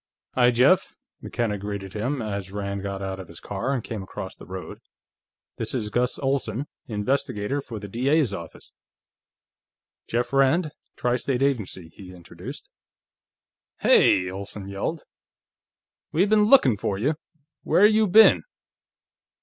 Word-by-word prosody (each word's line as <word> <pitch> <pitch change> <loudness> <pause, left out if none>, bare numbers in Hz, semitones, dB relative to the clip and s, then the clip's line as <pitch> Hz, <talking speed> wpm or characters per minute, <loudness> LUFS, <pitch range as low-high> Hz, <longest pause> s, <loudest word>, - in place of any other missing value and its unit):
"Hi, 125 -1 +5
Jeff," 125 +10 +3 0.3
McKenna 110 -4 -2
greeted 100 -1 -5
him, 125 +4 -2
as 100 -3 -4
Rand 100 -1 -4
got 100 0 -4
out 95 0 -4
of 95 - -8
his 85 - -11
car 110 +7 -3
and 130 -5 -1
came 110 -4 -5
across 95 0 -7
the - - -14
road. 95 0 -7 0.8
"This - - -3
is 105 -4 -2
Gus 125 +2 0
Olsen, 135 -2 -1 0.2
investigator 110 +2 -1
for 120 -4 -8
the 100 0 -7
D.A.'s 130 +3 +1
office. 85 -4 -9 1.3
Jeff 120 +3 -1
Rand; 145 +4 +3 0.2
Tri 125 0 0
State 130 +1 -1
Agency," 105 -11 -1
he 90 -2 -12
introduced. 85 -1 -10 1.1
"Hey!" 90 - +5
Olsen 100 +1 -7
yelled. 100 +11 -3 1.1
"We 175 +5 +3
been 210 0 +4
lookin' 175 - +6
for 100 -1 -2
you! 135 +10 +1 0.5
Where 205 - +4
you 215 0 +4
been?" 220 +4 +7
115 Hz, 135 wpm, -25 LUFS, 100-135 Hz, 1.3 s, been